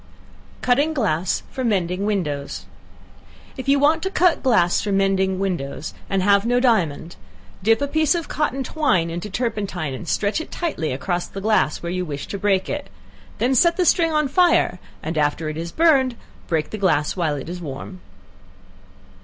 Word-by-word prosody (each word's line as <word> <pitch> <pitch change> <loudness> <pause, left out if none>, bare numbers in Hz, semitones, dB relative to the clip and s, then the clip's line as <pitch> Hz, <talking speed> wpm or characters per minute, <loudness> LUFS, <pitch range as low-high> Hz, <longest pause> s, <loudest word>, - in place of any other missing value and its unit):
Cutting 285 +6 +2
Glass 185 - 0
for 260 - -4
Mending 190 -3 0
Windows. 150 -9 -2 0.9
If 265 +1 -5
you 280 - +5
want 300 +3 +3
to 380 - -1
cut 360 -3 +2
glass 180 -10 +3
for 205 - -2
mending 195 -1 +1
windows, 170 -6 -3 0.2
and 195 -1 +1
have 200 0 +4
no 245 +2 +2
diamond, 175 - +1 0.5
dip 225 +6 +3
a - - 0
piece 310 +3 +2
of 335 -2 -3
cotton 275 -3 -1
twine 190 - +1
into 175 +5 -5
turpentine, 200 - -3
and 150 +6 -7
stretch 205 - 0
it - - -9
tightly 310 - -3
across 175 +7 -2
the 195 - -7
glass 210 -7 +1
where 170 - -3
you 180 0 -1
wish 145 -4 -5
to 200 - -4
break 195 -2 +1
it; 290 0 -4 0.5
then 255 +2 +1
set 335 +7 +4
the 365 - +2
string 330 0 +3
on 305 -2 +2
fire, 340 - +3 0.2
and 160 0 -2
after 150 +2 0
it 155 - -5
is 165 +1 -5
burned, 275 -7 +3 0.3
break 160 -3 -1
the 215 - -5
glass 150 -6 +1
while 165 -5 0
it 140 - -6
is 175 +1 -6
warm. 160 +5 -7
195 Hz, 180 wpm, -22 LUFS, 170-270 Hz, 0.9 s, you